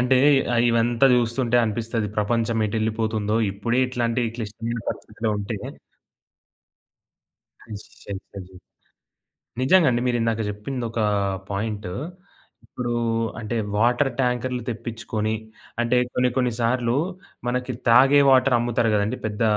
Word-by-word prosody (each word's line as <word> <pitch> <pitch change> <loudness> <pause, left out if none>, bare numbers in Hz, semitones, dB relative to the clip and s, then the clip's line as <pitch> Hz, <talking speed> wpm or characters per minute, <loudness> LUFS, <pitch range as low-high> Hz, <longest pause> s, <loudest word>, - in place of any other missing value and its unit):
అంటే 125 +1 +3 0.4
ఆహ్, 115 - +3
ఇవంతా 115 +2 +3
జూస్తుంటే 120 0 +1
అనిపిస్తది. 115 0 -2
ప్రపంచం 115 +1 +1
ఎటెళ్ళిపోతుందో 110 0 -1 0.2
ఇప్పుడే 115 +6 0
ఇట్లాంటి 120 -1 -1
ఈ - - -7
క్లిష్టమైన 115 +1 -4
పరిస్థితిలో 110 -1 -4
ఉంటే 105 +1 -4 2.0
హుష్ 105 -2 -9 0.3
అయితది. 95 -1 -9 1.1
నిజంగా 160 +6 +5
అండి. 120 0 0
మీరిందాక 115 -2 0
జెప్పిందొక 115 +3 -4 0.5
పాయింటు 105 -1 -3 0.7
ఇప్పుడు 120 -1 -4 0.5
అంటే 115 +1 -4 0.2
వాటర్ 120 +5 +2
ట్యాంకర్లు 125 0 -1
తెప్పిచ్చుకొని 110 -1 -3 0.5
అంటే 120 +1 +2 0.2
కొన్ని 125 0 +2
కొన్నిసార్లు 120 -1 +1 0.5
మనకి 125 +1 -2 0.2
తాగే 135 +4 +6
వాటర్ 130 -1 +5
అమ్ముతారు 120 -1 +1
గదండీ 105 +4 0
పెద్ద 105 +1 -3
115 Hz, 105 wpm, -23 LUFS, 110-125 Hz, 2.0 s, తాగే